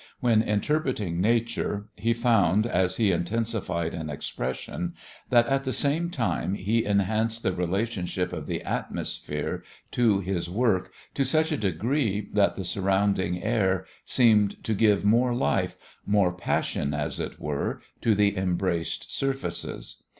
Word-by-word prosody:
When 115 Hz, -3 st, +4 dB
interpreting 105 Hz, -, 0 dB
nature 110 Hz, -1 st, 0 dB
he 115 Hz, 0 st, 0 dB
found, 110 Hz, -4 st, +3 dB
as 95 Hz, -4 st, +1 dB
he 110 Hz, -4 st, +3 dB
intensified 90 Hz, -2 st, -1 dB
an 80 Hz, -2 st, -4 dB
expression, 65 Hz, -3 st, -4 dB, 0.3 s
that, 120 Hz, -1 st, +5 dB
at 135 Hz, +2 st, +1 dB
the 130 Hz, -, -2 dB
same 155 Hz, +6 st, 0 dB
time, 115 Hz, -, -1 dB
he 110 Hz, +4 st, +1 dB
enhanced 110 Hz, +3 st, +1 dB
the 95 Hz, -, +1 dB
relationship 90 Hz, 0 st, -1 dB
of -, -, -5 dB
the -, -, -3 dB
atmosphere 75 Hz, 0 st, -3 dB, 0.3 s
to 110 Hz, -5 st, +3 dB
his 90 Hz, -3 st, -2 dB
work 100 Hz, -2 st, +1 dB, 0.2 s
to 140 Hz, -, +1 dB
such 155 Hz, +5 st, +2 dB
a -, -, +2 dB
degree 105 Hz, -, 0 dB
that 100 Hz, -1 st, +3 dB
the 95 Hz, -, -5 dB
surrounding 95 Hz, -1 st, +1 dB
air 95 Hz, -5 st, +1 dB, 0.2 s
seemed 105 Hz, -5 st, +3 dB
to 110 Hz, -, 0 dB
give 105 Hz, -1 st, +3 dB
more 120 Hz, +3 st, +4 dB
life, -, -, 0 dB, 0.3 s
more 100 Hz, -3 st, +3 dB
passion, 75 Hz, -4 st, -1 dB
as 75 Hz, 0 st, -3 dB
it -, -, -5 dB
were, 75 Hz, -2 st, -2 dB, 0.2 s
to 110 Hz, -2 st, +3 dB
the 100 Hz, 0 st, +3 dB
embraced 90 Hz, -2 st, -1 dB
surfaces. 135 Hz, 0 st, -3 dB
105 Hz, 140 wpm, -27 LUFS, 90-115 Hz, 0.3 s, that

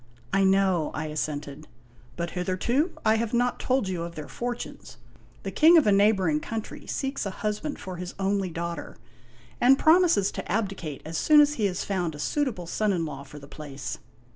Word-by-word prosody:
" -, -, -28 dB
I 195 Hz, -, +4 dB
know," 190 Hz, -4 st, +3 dB
I -, -, -3 dB
assented. 150 Hz, -1 st, -4 dB, 0.2 s
" 120 Hz, 0 st, -27 dB
But 170 Hz, 0 st, -3 dB
hitherto 215 Hz, -, 0 dB
I 220 Hz, 0 st, +4 dB
have 230 Hz, +1 st, -1 dB
not 245 Hz, +1 st, +1 dB
told 260 Hz, -5 st, +1 dB
you 180 Hz, -3 st, -3 dB
of 170 Hz, 0 st, -6 dB
their 150 Hz, -2 st, -7 dB
fortunes. 240 Hz, -, -6 dB, 0.5 s
The -, -, -4 dB
King 330 Hz, +2 st, +6 dB
of 315 Hz, -, +5 dB
a 210 Hz, -, +4 dB
neighboring 195 Hz, -6 st, +3 dB
country 220 Hz, +6 st, -6 dB
seeks 270 Hz, +1 st, -2 dB
a 200 Hz, -, -2 dB, 0.2 s
husband 215 Hz, +8 st, -2 dB
for 185 Hz, -1 st, -7 dB
his 180 Hz, +1 st, -6 dB
only 195 Hz, -1 st, 0 dB
daughter, 170 Hz, -2 st, -5 dB, 0.6 s
and 260 Hz, +2 st, +6 dB
promises 320 Hz, -, +4 dB
to -, -, -6 dB
abdicate 195 Hz, -8 st, -3 dB
as 165 Hz, +1 st, -3 dB
soon 305 Hz, -1 st, +6 dB
as 295 Hz, 0 st, +5 dB
he 225 Hz, -8 st, -1 dB
has 185 Hz, -2 st, -3 dB
found 180 Hz, -5 st, -2 dB
a -, -, -10 dB
suitable 245 Hz, -, -1 dB
son 210 Hz, +5 st, 0 dB
in 170 Hz, -4 st, 0 dB
law 140 Hz, -3 st, -6 dB
for 140 Hz, +1 st, -12 dB
the 140 Hz, -1 st, -11 dB
place." 140 Hz, -4 st, -7 dB
190 Hz, 195 wpm, -26 LUFS, 160-230 Hz, 0.6 s, King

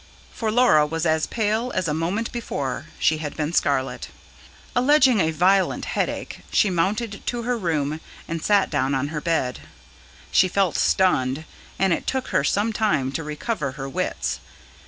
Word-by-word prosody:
For 225 Hz, -, -2 dB
Laura 225 Hz, -10 st, +5 dB
was 165 Hz, +2 st, -2 dB
as 160 Hz, -1 st, +2 dB
pale 225 Hz, +2 st, -1 dB
as 185 Hz, -2 st, 0 dB
a 150 Hz, -, 0 dB
moment 180 Hz, +9 st, -1 dB
before 150 Hz, -, -4 dB
she 155 Hz, 0 st, +2 dB
had 150 Hz, -2 st, -5 dB
been 155 Hz, +1 st, -2 dB
scarlet. 130 Hz, -5 st, 0 dB, 0.7 s
Alleging 255 Hz, -2 st, +5 dB
a 160 Hz, -3 st, +3 dB
violent 185 Hz, +4 st, +2 dB
headache, -, -, -3 dB
she 205 Hz, -, +3 dB
mounted 200 Hz, +5 st, -1 dB
to 240 Hz, -1 st, -2 dB
her 245 Hz, +1 st, 0 dB
room, 155 Hz, -7 st, -1 dB, 0.3 s
and 165 Hz, -1 st, -3 dB
sat 205 Hz, +1 st, +2 dB
down 135 Hz, -2 st, +1 dB
on 140 Hz, +2 st, -1 dB
her 150 Hz, -1 st, -4 dB
bed. 160 Hz, -7 st, -1 dB, 0.7 s
She 185 Hz, -, +5 dB
felt 185 Hz, -2 st, +1 dB
stunned, 155 Hz, -6 st, +2 dB, 0.3 s
and 190 Hz, -2 st, +3 dB
it -, -, -3 dB
took 265 Hz, -1 st, -1 dB
her -, -, +2 dB
some 210 Hz, +8 st, +1 dB
time 155 Hz, -12 st, +1 dB
to 150 Hz, +4 st, -3 dB
recover 150 Hz, -, -3 dB
her 135 Hz, -1 st, -6 dB
wits. 135 Hz, -, -2 dB
165 Hz, 165 wpm, -23 LUFS, 150-215 Hz, 0.7 s, Laura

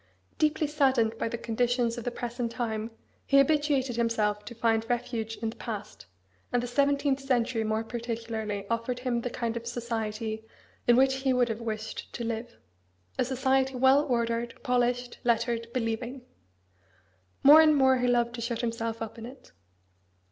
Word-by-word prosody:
Deeply 305 Hz, 0 st, +2 dB
saddened 265 Hz, -7 st, +2 dB
by -, -, -1 dB
the 235 Hz, -, -3 dB
conditions 240 Hz, +1 st, 0 dB
of 240 Hz, -, -6 dB
the 245 Hz, -, -1 dB
present 240 Hz, -1 st, -4 dB
time, 225 Hz, -2 st, -3 dB, 0.3 s
he 275 Hz, -, +3 dB
habituated 275 Hz, -3 st, +2 dB
himself 215 Hz, -3 st, +1 dB
to 235 Hz, -, -9 dB
find 225 Hz, -1 st, +2 dB
a -, -, -15 dB
refuge 230 Hz, -2 st, -2 dB
in 225 Hz, -, 0 dB
the -, -, -13 dB
past, 210 Hz, -3 st, -7 dB, 0.4 s
and 245 Hz, 0 st, +1 dB
the -, -, -1 dB
seventeenth 280 Hz, +2 st, +1 dB
century 250 Hz, -4 st, 0 dB
more 220 Hz, +1 st, 0 dB
particularly 225 Hz, -3 st, -4 dB
offered 230 Hz, +2 st, -1 dB
him 245 Hz, -2 st, 0 dB
the 245 Hz, -, -3 dB
kind 235 Hz, -1 st, -3 dB
of 235 Hz, 0 st, -5 dB
society 225 Hz, -2 st, -3 dB, 0.4 s
in 240 Hz, -, +7 dB
which 265 Hz, +1 st, +4 dB
he 265 Hz, -1 st, +1 dB
would 245 Hz, -1 st, +2 dB
have 225 Hz, +1 st, -3 dB
wished 220 Hz, -1 st, -5 dB
to 240 Hz, -, -4 dB
live 230 Hz, +1 st, -4 dB, 0.6 s
a -, -, +4 dB
society, 265 Hz, +1 st, +1 dB
well 265 Hz, +3 st, +5 dB
ordered, 235 Hz, -2 st, -1 dB
polished, 245 Hz, -1 st, 0 dB
lettered, 235 Hz, 0 st, 0 dB
believing. 240 Hz, +2 st, -3 dB, 1.2 s
More 295 Hz, +3 st, +10 dB
and 310 Hz, -1 st, +5 dB
more 265 Hz, -2 st, +5 dB
he 250 Hz, 0 st, +1 dB
loved 240 Hz, -1 st, +2 dB
to 235 Hz, -, -5 dB
shut 235 Hz, 0 st, -2 dB
himself 230 Hz, -1 st, -2 dB
up 225 Hz, +1 st, -8 dB
in 225 Hz, -, -7 dB
it. 260 Hz, +2 st, -14 dB
235 Hz, 170 wpm, -28 LUFS, 230-255 Hz, 1.2 s, More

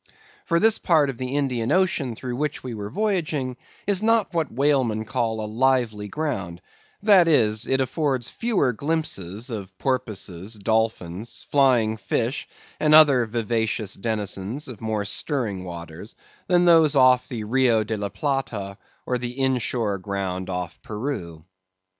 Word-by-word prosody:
For 170 Hz, -1 st, +3 dB
this 220 Hz, +2 st, +4 dB
part 155 Hz, -6 st, +3 dB
of 125 Hz, -, -13 dB
the 130 Hz, +2 st, -3 dB
Indian 125 Hz, -5 st, 0 dB
Ocean 170 Hz, -10 st, +1 dB
through 125 Hz, +1 st, -5 dB
which 150 Hz, +2 st, -3 dB
we 130 Hz, -, -5 dB
then 115 Hz, -, -6 dB
were 100 Hz, 0 st, -5 dB
voyaging 165 Hz, -, -1 dB, 0.3 s
is 200 Hz, -1 st, +1 dB
not 225 Hz, -2 st, +2 dB
what 160 Hz, -5 st, -1 dB
whalemen 130 Hz, -5 st, +1 dB
call 115 Hz, -1 st, -1 dB
a 110 Hz, -, -3 dB
lively 115 Hz, -2 st, +1 dB
ground; 100 Hz, -, -3 dB, 0.4 s
that 195 Hz, -5 st, +6 dB
is, 110 Hz, -8 st, +3 dB
it 135 Hz, -, +1 dB
affords 130 Hz, -3 st, -1 dB
fewer 205 Hz, -, 0 dB
glimpses 120 Hz, -, -3 dB
of 95 Hz, -4 st, -7 dB
porpoises, 110 Hz, -6 st, -3 dB
dolphins, 110 Hz, -2 st, -2 dB
flying 125 Hz, -6 st, +3 dB
fish, 115 Hz, +5 st, -2 dB, 0.3 s
and 155 Hz, 0 st, +5 dB
other 140 Hz, -6 st, +7 dB
vivacious 110 Hz, -2 st, -1 dB
denizens 105 Hz, +4 st, -3 dB
of 125 Hz, -5 st, -9 dB
more 110 Hz, -2 st, -2 dB
stirring 105 Hz, -, -2 dB
waters, 85 Hz, +4 st, -8 dB, 0.3 s
than 175 Hz, -1 st, +4 dB
those 160 Hz, -4 st, +5 dB
off 130 Hz, -2 st, +5 dB
the 115 Hz, -4 st, -5 dB
Rio 115 Hz, -1 st, +3 dB
de 110 Hz, +1 st, -3 dB
la 100 Hz, -1 st, -3 dB
Plata, 110 Hz, -9 st, -3 dB, 0.3 s
or 125 Hz, -1 st, -1 dB
the 125 Hz, +2 st, -5 dB
in 130 Hz, -1 st, +2 dB
shore 110 Hz, -4 st, -1 dB
ground 95 Hz, -2 st, -3 dB
off 90 Hz, -2 st, -4 dB
Peru. 105 Hz, -, -5 dB
120 Hz, 150 wpm, -24 LUFS, 105-140 Hz, 0.4 s, other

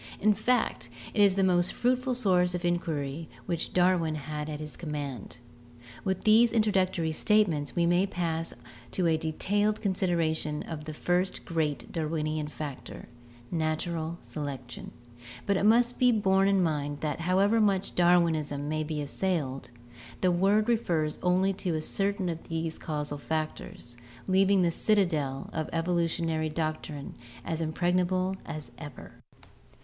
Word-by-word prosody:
In 210 Hz, +1 st, +4 dB
fact, 215 Hz, -, 0 dB, 0.2 s
it 210 Hz, -, +2 dB
was 200 Hz, -2 st, +5 dB
the 195 Hz, -, +2 dB
most 175 Hz, -1 st, +3 dB
fruitful 255 Hz, +1 st, 0 dB
source 180 Hz, -6 st, +2 dB
of 175 Hz, 0 st, -3 dB
inquiry 160 Hz, -3 st, -2 dB, 0.2 s
which 170 Hz, -3 st, -2 dB
Darwin 175 Hz, -3 st, +2 dB
had 150 Hz, 0 st, -5 dB
at 150 Hz, -1 st, -4 dB
his 150 Hz, -1 st, -6 dB
command. 145 Hz, -, -5 dB, 0.7 s
With 190 Hz, -1 st, -1 dB
these 225 Hz, +2 st, +6 dB
introductory 190 Hz, -7 st, +1 dB
statements 155 Hz, -, +2 dB
we 170 Hz, -, +3 dB
may 175 Hz, +3 st, +3 dB
pass 165 Hz, -3 st, -2 dB, 0.4 s
to 185 Hz, -, 0 dB
a 165 Hz, -1 st, +4 dB
detailed 205 Hz, +7 st, 0 dB
consideration 170 Hz, -6 st, 0 dB
of 155 Hz, -2 st, -7 dB
the 155 Hz, -, -5 dB
first 180 Hz, +4 st, 0 dB
great 150 Hz, -7 st, -2 dB
Darwinian 155 Hz, -1 st, -2 dB
factor, 150 Hz, -3 st, -7 dB, 0.4 s
natural 160 Hz, 0 st, -2 dB
selection, 135 Hz, -5 st, -6 dB, 0.6 s
but 200 Hz, -, +2 dB
it 195 Hz, -, +1 dB
must 240 Hz, +2 st, +4 dB
be 250 Hz, -1 st, +5 dB
borne 195 Hz, -3 st, +3 dB
in 195 Hz, -2 st, +3 dB
mind 145 Hz, -3 st, -2 dB
that 155 Hz, 0 st, -2 dB
however 195 Hz, +6 st, +3 dB
much 195 Hz, -2 st, +1 dB
Darwinism 165 Hz, -5 st, +2 dB
may 155 Hz, +1 st, -1 dB
be 150 Hz, -1 st, -3 dB
assailed, 140 Hz, -6 st, -2 dB, 0.5 s
the 185 Hz, -, +3 dB
word 195 Hz, +4 st, +3 dB
refers 170 Hz, -10 st, 0 dB
only 185 Hz, +2 st, +2 dB
to 180 Hz, -4 st, -2 dB
certain 195 Hz, +4 st, -1 dB
of 165 Hz, -1 st, -5 dB
these 165 Hz, 0 st, -3 dB
causal 150 Hz, -2 st, -4 dB
factors, 155 Hz, -6 st, -4 dB, 0.3 s
leaving 190 Hz, 0 st, +4 dB
the 170 Hz, -, +2 dB
citadel 160 Hz, -10 st, 0 dB
of 160 Hz, -1 st, -2 dB
the -, -, -7 dB
evolutionary 165 Hz, -2 st, 0 dB
doctrine 155 Hz, -2 st, -4 dB, 0.3 s
as 165 Hz, 0 st, -2 dB
impregnable 180 Hz, +3 st, +1 dB
as 150 Hz, -6 st, -7 dB
ever. 145 Hz, -4 st, -9 dB
170 Hz, 140 wpm, -29 LUFS, 155-190 Hz, 0.7 s, these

